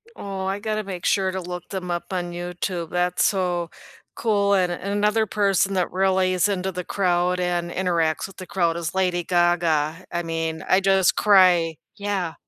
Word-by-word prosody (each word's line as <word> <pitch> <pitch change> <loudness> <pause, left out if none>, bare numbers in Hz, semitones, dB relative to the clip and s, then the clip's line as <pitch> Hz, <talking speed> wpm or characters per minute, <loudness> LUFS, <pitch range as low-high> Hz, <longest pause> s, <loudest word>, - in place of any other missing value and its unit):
Oh, 195 -1 -5
I 195 +1 -2
gotta 215 0 -2
make 185 -3 -6
sure 190 -2 +2
to 190 0 -4
look 180 0 -7
them 180 -3 -4
up 175 0 -2
on 175 -1 -2
YouTube, 175 -1 -4
that's 180 0 0
so 180 -4 0 0.5
cool 200 -3 +2
and 180 -2 +2
and 195 +3 -4
another 210 +2 +2
person 195 -1 +1
that 180 - 0
really 185 0 +2
is 185 +2 +2
into 190 -1 -2
the 180 0 -5
crowd 180 -1 0
and 175 -1 -1
interacts 170 -4 0
with 195 - -12
the 185 - -8
crowd 170 -3 0
is 170 +1 -4
Lady 180 -2 +1
Gaga, 170 -2 +1
I 175 0 -2
mean, 165 -1 -3
I 185 - +4
just 195 -1 +3
cry, 180 -5 +4 0.2
yeah. 200 -5 -2
180 Hz, 185 wpm, -23 LUFS, 175-195 Hz, 0.5 s, I